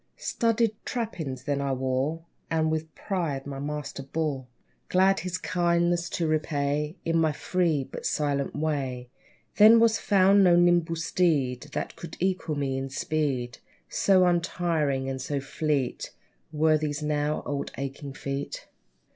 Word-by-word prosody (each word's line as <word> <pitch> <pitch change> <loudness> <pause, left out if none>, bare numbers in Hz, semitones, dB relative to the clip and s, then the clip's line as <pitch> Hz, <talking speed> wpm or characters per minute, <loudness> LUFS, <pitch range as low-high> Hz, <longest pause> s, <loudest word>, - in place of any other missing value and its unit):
Studded 230 -2 +1
trappings 160 - -4
then 140 0 -1
I 140 -1 0
wore, 130 +5 -1 0.2
And 160 -1 +1
with 160 0 -3
pride 160 -9 -2
my 140 -1 -6
master 145 -1 -4
bore, 140 -2 -3 0.4
Glad 190 +1 +4
his 185 0 -3
kindness 175 -1 +1
to 170 - -1
repay 150 -1 0
In 165 0 +2
my 160 -1 +3
free, 165 -2 0
but - - -5
silent 140 -2 -1
way. 135 -5 -2 0.5
Then 220 +2 +8
was 225 -1 +4
found 195 0 +5
no 175 -2 +6
nimble 175 -1 +3
steed 150 -6 0
That - - -3
could 170 -2 -9
equal 185 -4 -1
me 135 -2 -1
in 135 0 -4
speed, 135 -4 -2 0.3
So 185 -2 +4
untiring, 165 -6 0
and 135 -1 -3
so 140 +2 -2
fleet 140 -2 -2 0.4
Were 155 0 +3
these 150 0 -3
now, 150 0 0
old, 145 -1 -3
aching 140 +1 -5
feet. 140 +1 -5
155 Hz, 140 wpm, -27 LUFS, 140-175 Hz, 0.5 s, Then